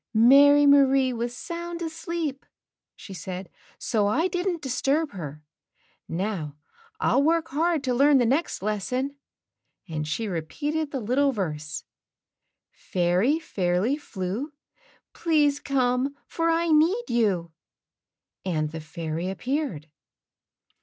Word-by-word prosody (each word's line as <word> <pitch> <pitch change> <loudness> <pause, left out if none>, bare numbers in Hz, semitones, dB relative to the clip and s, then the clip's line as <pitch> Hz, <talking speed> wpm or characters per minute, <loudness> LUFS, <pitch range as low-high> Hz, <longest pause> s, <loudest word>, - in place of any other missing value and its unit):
"Mary 285 +5 +7
Marie 275 -2 +5
was 240 +1 -3
sound 340 +1 -5
asleep," 325 -3 -4 0.5
she 195 - -10
said, 185 +1 -6 0.3
"so 210 -3 0
I 320 - +2
didn't 360 -3 -2
disturb 275 +4 0
her. 150 -5 -8 0.7
Now 170 -5 -3 0.4
I'll 265 - +3
work 330 +2 +2
hard 320 +1 +1
to 255 -2 0
learn 280 +3 +5
the 245 - +3
next 270 - 0
lesson," 250 +7 -2 0.7
and 155 -3 -4
she 220 +8 -2
repeated 290 - -2
the 275 - -3
little 265 +6 +2
verse, 155 - -4 0.9
"Fairy 180 - +1
Fairly 195 - 0
Flew, 225 0 -5 0.6
Please 295 -4 +2
come, 260 0 0
for 330 0 -1
I 335 +1 +1
need 325 +9 +4
you;" 195 -8 +1 0.9
and 155 -4 -1
the 160 0 -6
fairy 160 +2 -4
appeared. 245 - -3
255 Hz, 115 wpm, -26 LUFS, 185-300 Hz, 0.9 s, Mary